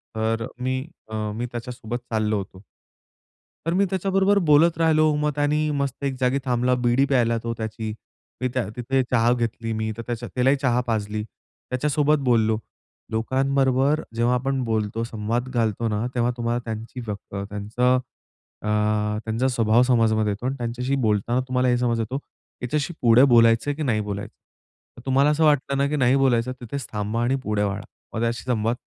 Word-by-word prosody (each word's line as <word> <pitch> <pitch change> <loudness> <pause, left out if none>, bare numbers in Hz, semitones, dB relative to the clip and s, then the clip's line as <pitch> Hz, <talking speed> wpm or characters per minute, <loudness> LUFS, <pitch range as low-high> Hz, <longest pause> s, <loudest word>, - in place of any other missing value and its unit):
तर 110 +1 0
मी 130 +1 -1 0.3
अ 110 - -5 0.2
मी 120 +2 -2
त्याच्यासोबत 120 -1 -5
चाललो 110 -2 0
होतो. 95 -1 -7 1.1
तर 165 - +1
मी 195 - +3
त्याच्याबरोबर 195 +1 +2
बोलत 160 +2 +5
राहिलो, 155 -2 +3
मग 150 0 +1
त्यानी 150 +1 +1
मस्त 140 0 -3
एक 135 -1 0
जागी 130 +1 +2
थांबला. 125 0 +2
बीडी 125 +2 +2
प्यायला 120 -4 +2
तो 115 - -2
त्याची. 110 -1 -4 0.5
मी 130 - 0
त्या 125 -6 -1
तिथे 130 +2 +1
चहा 120 -1 +3
घेतली 115 -1 -2
मी. 110 0 -1
तर 115 - -5
त्याच्या 120 -1 -4
त्यालाही 130 +2 +3
चहा 125 -2 +2
पाजली. 105 -2 -1
त्याच्यासोबत 145 +6 -1
बोललो. 110 -2 +3 0.6
लोकांबरोबर 135 +4 +1
जेव्हा 120 +2 +2
आपण 135 +1 -1
बोलतो, 110 -1 -1
संवाद 115 +2 -2
घालतो 115 -2 0
ना 105 +2 -1
तेव्हा 120 -1 +1
तुम्हाला 120 0 -1
त्यांची 115 +2 -6
व्यक्त 105 -1 -7 0.2
त्त्यांचा 115 +5 +1 0.6
अ 105 +2 0
स्वभाव 115 -1 +3
समजमध्ये 110 -4 +2
येतो 105 +5 -5
आणि 135 - 0
त्यांच्याशी 125 +3 -2
बोलताना 110 +3 +1
तुम्हाला 125 0 +1
हे 125 - +3
समज 120 -2 +1
येतो 115 +5 -2 0.4
याच्याशी 145 +6 -1
पुढे 120 +1 +6
बोलायचं 115 +1 +5
आहे 145 - -2
की 155 - -3
नाही 115 -7 +1
बोलायचं? 100 -1 -5 0.6
तर 120 - -12
तुम्हाला 135 +2 +4
असं 155 +2 +2
वाटलं 140 -2 +2
ना 140 - +3
की 150 - -1
नाही 130 -1 +3
बोलायचं 130 -2 +2
तिथेच 125 +1 -5
थांबा 105 +2 -2
आणि 130 +3 +2
पुढे 105 -1 0
वळा. 100 0 -1 0.3
मग 110 - -2
त्याचाशी 115 -2 -1
संवाद 115 0 +1
120 Hz, 170 wpm, -24 LUFS, 110-135 Hz, 1.1 s, पुढे